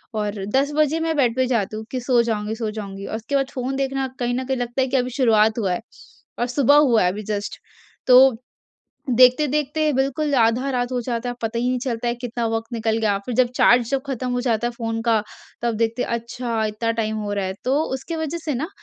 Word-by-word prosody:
और 205 -2 -2
10 280 +2 +2
बजे 305 +1 +2
मैं 325 -1 -1
बेड 245 -5 +2
पे 260 0 +2
जाती 215 -4 -1
हूँ 220 - -7
कि 255 - -2
सो 245 -1 +3
जाऊँगी, 215 -1 -2
सो 225 -2 -3
जाऊँगी, 200 -2 -7
और - - -4
उसके 230 +5 -3
बाद 270 -1 +1
फ़ोन 260 +1 -3
देखना 270 0 -1
कहीं 245 -1 0
ना 255 +1 -1
कहीं 265 0 -2
लगता 245 +2 -2
है 260 - +1
कि 265 +1 +1
अभी 250 0 0
शुरुआत 220 -3 +3
हुआ 195 -4 0
है 175 - -3 0.6
और 240 - +1
सुबह 280 +2 +3
हुआ 245 -8 +5
है 180 - +2
अभी 210 +2 -6
जस्ट। 205 0 -4 0.5
तो 255 0 +7 0.8
देखते-देखते 295 +4 +3
बिल्कुल 275 +2 0
आधा 245 +3 +2
रात 245 -1 -1
हो 250 - 0
जाता 235 0 -3
है, 245 - -3
पता 225 +1 -2
ही 245 +1 0
नहीं 255 - 0
चलता 240 -2 -2
है 235 - 0
कितना 240 -1 -3
वक़्त 225 +1 -3
निकल 225 -1 0
गया। 210 -3 +1
फिर 245 - -3
जब 250 0 +3
चार्ज 240 -1 +4
जब 275 -1 0
ख़त्म 255 -2 -3
हो 245 - 0
जाता 235 -2 0
है - - 0
फ़ोन 225 -1 -3
का, 225 -2 +2 0.4
तब 235 -1 0
देखते 230 +2 0
हैं - - -4
अच्छा 235 -1 -3
इतना 215 +2 -2
टाइम 220 -1 -2
हो 210 -1 -3
रहा 200 -1 -1
है। 190 - -3
तो 270 +4 +2
उसकी 325 +5 -5
वज़ह 320 +1 -3
से 300 - -1
ना 285 +7 -3
245 Hz, 240 wpm, -22 LUFS, 225-265 Hz, 0.8 s, तो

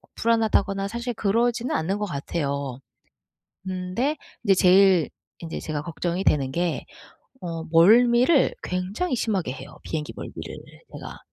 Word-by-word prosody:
불안하다거나 215 -4 +1
사실 235 +3 -4
그러지는 235 +3 0
않는 190 +6 -1
것 210 - -1
같아요. 140 -5 -3 0.9
근데 185 +10 -1 0.3
이제 195 - +5
제일 185 -2 +5 0.3
인제 165 -1 -5
제가 155 -2 -4
걱정이 170 +3 -3
되는 135 -7 +2
게 175 +2 -1 0.6
어 165 -2 -5
멀미를 240 - +5
굉장히 190 - -2
심하게 200 - -1
해요. 130 - -11
비행기 150 -2 -4
멀미를 - - -7 0.4
제가. - - -9
185 Hz, 285 characters per minute, -24 LUFS, 165-225 Hz, 0.9 s, 이제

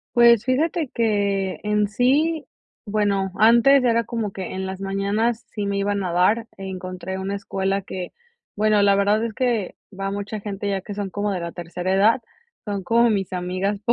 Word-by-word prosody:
Pues, 235 -2 +6
fíjate 300 +3 0
que 200 -4 0
en 210 0 +1
sí, 280 +9 +1 0.4
bueno, 200 -2 0
antes 235 +5 +6
era 230 -1 +3
como 220 -4 -3
que 190 -2 -6
en 190 0 -3
las 190 0 -6
mañanas 205 +5 -1
sí 205 -2 -3
me 200 0 -1
iban 200 0 0
a 180 -2 -2
dar, 210 +6 +2
encontré 185 -1 -6
una 195 +1 -3
escuela 195 0 -2
que, 185 -1 -6 0.4
bueno, 215 0 +3
la 200 0 +5
verdad 205 +2 +2
es 225 -2 -4
que 235 -7 -1 0.2
va 195 0 -2
mucha 205 +1 -4
gente, 200 0 -4
ya 195 -1 -1
que 205 +2 -8
son 200 -2 -4
como 205 +1 -2
de 185 -3 -2
la 170 0 -5
tercera 175 +2 -4
edad, 220 +6 +4 0.4
son 200 -2 -3
como 235 +4 +3
mis 195 -3 -1
amigas, 185 +3 -2
200 Hz, 180 wpm, -23 LUFS, 190-225 Hz, 0.4 s, Pues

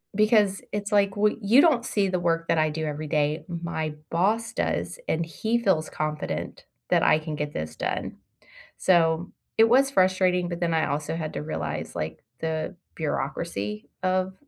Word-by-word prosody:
because 210 -2 +3
it's 205 0 -3
like, 200 -1 +3
"Well, 210 +1 +3
you 230 +8 +6
don't 270 -8 +3
see 200 -2 +1
the 180 -1 0
work 165 -1 0
that 165 - +2
I 155 0 +3
do 155 +1 -3
every 150 +1 -4
day, 150 0 0
my 170 -3 -3 0.2
boss 210 +7 +1
does, - - -2
and 165 +1 0
he 220 +9 -1
feels 190 -9 +1
confident 155 -1 -4 0.2
that - - +3
I 155 - +5
can 155 -1 -5
get 150 0 -3
this 80 0 -4
done." - - -3 0.6
So, 170 -1 +3 0.3
it 225 - +8
was 270 +3 +5
frustrating, 185 -3 +3
but 170 0 -4
then 170 -1 0
I 160 - +2
also 145 +3 -2
had 160 -2 -4
to - - -3
realize, 155 +1 -4
like, 80 +1 -4 0.2
the 160 +3 -2 0.2
bureaucracy 135 -8 -3
of 185 0 +1
170 Hz, 175 wpm, -26 LUFS, 155-200 Hz, 0.6 s, it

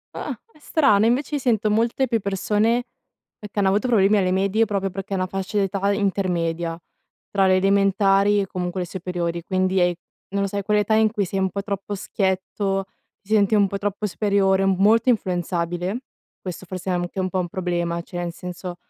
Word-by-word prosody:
Ah, - - -5
è 305 - -23
strano. 245 -9 +3
Invece 275 +5 0
io - - 0
sento 220 -4 +1
molte 235 +4 +1
più 230 -1 +1
persone 210 +4 +1 0.6
e 210 - -8
che 210 - -21
hanno 195 -1 +3
avuto 205 +5 +1
problemi 210 -3 +4
alle 185 -2 +2
medie 195 +4 +2
proprio 195 -2 -1
perché 195 +1 -6
è - - 0
una 185 - 0
fascia 195 +3 -4
d'età 200 0 +1
intermedia 175 -4 -1 0.5
tra 195 -1 +3
le 185 0 +4
elementari 195 +1 +3
e 195 - -1
comunque 180 0 -3
le 180 - -2
superiori; 170 -2 -3
quindi 185 0 +1
è 175 0 +3 0.4
non 200 0 -1
lo 200 - 0
so 200 - -6
è 200 - -1
quell'età 210 +1 +2
in 220 -1 +4
cui 205 -4 -1
sei 195 +2 -2
un 190 -1 +1
po' 200 +2 -4
troppo 200 0 -4
schietto, 195 0 -1 0.4
si 215 +2 -1
senti 205 0 +3
un 200 -1 +5
po' 200 - -4
troppo 205 +1 -2
superiore, 195 -1 +2
m 190 -1 +2
molto 225 +5 +4
influenzabile. 175 0 -1 0.4
Questo 185 0 -7
forse 185 +1 -6
è - - +1
anche 175 +2 -3
un 185 - 0
po' 185 0 -1
un 175 - -3
problema, 175 -2 -2
cioè 175 - -10
nel 175 -1 -3
senso 180 0 -7
195 Hz, 205 wpm, -23 LUFS, 185-205 Hz, 0.6 s, un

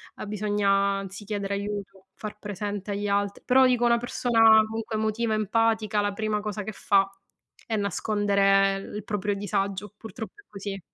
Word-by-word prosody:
a - - -7
bisogna, 205 -1 0 0.3
anzi, 195 +1 -8
chiedere 200 -1 -3
aiuto, 200 -2 -5
far 210 -1 -7
presente 205 0 -5
agli 205 +1 -2
alt 200 0 -1
però 260 +1 +6
dico 245 -1 +2
una 235 0 +4
persona 225 -2 +5
comunque 225 0 -4
emotiva, 220 +1 0
empatica, 215 0 +1
la 205 -1 -1
prima 215 0 -1
cosa 210 -1 -4
che 220 - -5
fa 195 -1 +2 0.6
è 225 - -2
nascondere 200 0 +2 0.2
l - - -9
proprio 205 -1 -2
disagio, 200 0 -2
purtroppo 220 0 -8
è - - -40
così. 200 -1 -6
205 Hz, 160 wpm, -26 LUFS, 200-220 Hz, 0.6 s, però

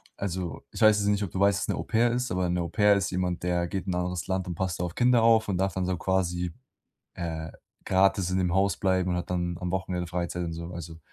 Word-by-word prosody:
Also, 95 -3 -4
ich - - -8
weiß 110 -1 +7
jetzt 100 -1 0
nicht, 105 0 +1
ob 95 - -4
du 95 - -4
weißt, 100 -1 +4
was - - -2
'ne - - 0
Au-pair 115 +2 +1
ist, 125 -2 -1
aber 90 -1 0
'ne 90 0 0
Au-pair 105 +4 +3
ist 100 -1 -1
jemand, 90 -1 -2
der 90 -1 0
geht 95 +1 -4
in 95 - -2
'n - - -1
anderes 90 -1 -2
Land 95 -1 -1
und 90 - -4
passt 90 0 -2
da 90 - 0
auf 85 - -6
Kinder 120 -1 +4
auf 110 -2 +4
und 95 - 0
darf 95 0 0
dann 95 0 -1
so 90 0 -1
quasi, 90 -1 -1 0.6
äh, 80 -1 -5 0.3
gratis 95 -1 +3
in 95 - +1
dem 90 -2 +1
Haus 95 -2 +2
bleiben 95 -1 +1
und 90 - 0
hat 90 - -4
dann 85 -1 -2
am 90 -1 -3
Wochenende 90 -1 -2
Freizeit 90 0 -3
und 85 -1 -4
so, 85 +1 -6
also, 80 -1 -8
90 Hz, 265 wpm, -27 LUFS, 85-95 Hz, 0.6 s, weiß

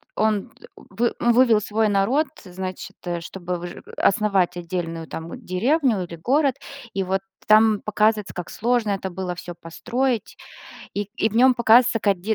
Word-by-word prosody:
он 215 -2 0
д - - -18
вы 230 +5 -2
ну 240 - +3
вывел 235 -3 +5
свой 215 +1 0
народ, 230 +10 +2 0.2
значит, 185 0 -7 0.2
чтобы 180 +1 -5
выжи 175 0 -8
основать 195 -3 +2
отдельную, 165 -2 -4
там, 165 +1 -7
деревню 230 - +1
или 170 -1 -8
город, 270 - +2 0.4
и 195 0 -1
вот 190 +1 -1 0.2
там 215 0 +5
показывается, 215 0 +1
как 180 -1 -6
сложно 240 -1 0
это 195 -1 -2
было 180 0 -4
всё 175 0 -8
построить, 240 +9 -2 0.6
и 205 0 -3
и 220 - +2
в 215 - -10
нём 255 +2 +6
показывается 235 0 +5
как 200 -4 +1
де 215 +4 0
205 Hz, 160 wpm, -23 LUFS, 180-230 Hz, 0.6 s, нём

